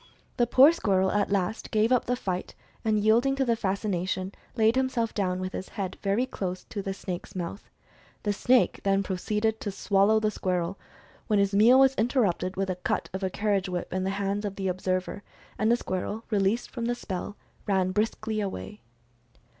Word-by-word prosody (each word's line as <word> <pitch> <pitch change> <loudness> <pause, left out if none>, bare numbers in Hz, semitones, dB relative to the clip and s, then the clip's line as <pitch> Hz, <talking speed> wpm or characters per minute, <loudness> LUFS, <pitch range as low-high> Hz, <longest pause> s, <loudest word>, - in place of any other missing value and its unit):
The 240 -2 +3
poor 265 +5 +7
squirrel 190 - +1
at 205 -1 +1
last 195 +1 -1
gave 220 +2 +2
up 255 - +3
the 250 - 0
fight, 185 -7 -4 0.3
and 220 -1 +2
yielding 230 +6 +3
to 270 -1 +1
the 235 -2 +2
fascination, 190 -2 -2 0.2
laid 225 0 +3
himself 260 -3 0
down 185 -3 -1
with 185 0 -4
his 190 - -5
head 195 -4 -4
very 200 +5 +1
close 185 -7 -4
to 205 - -4
the 195 - -3
snake's 185 -2 -6
mouth. 180 +3 -5 0.5
The 205 - +1
snake 245 +4 +3
then 195 0 +2
proceeded 210 +4 -1
to 205 - -3
swallow 200 +2 +3
the 215 -1 0
squirrel, 180 -2 -2 0.5
when 215 - +2
his 200 0 +2
meal 225 +6 +6
was 270 0 +6
interrupted 205 -6 +1
with 195 0 -1
a 180 - -4
cut 180 - -2
of 190 - -4
a 190 - 0
carriage 200 -1 0
whip 180 -1 -4
in 185 0 -1
the 190 - 0
hands 200 +1 -1
of 200 -2 -3
the 190 -1 -2
observer, 185 +1 -2 0.4
and 220 +1 +3
the 240 - +4
squirrel, 205 +2 -4
released 205 +3 +1
from 235 -2 -4
the 240 +1 0
spell, 200 -2 -5 0.3
ran 190 -2 +2
briskly 215 +1 -1
away. 105 - -5
200 Hz, 190 wpm, -27 LUFS, 185-220 Hz, 0.5 s, poor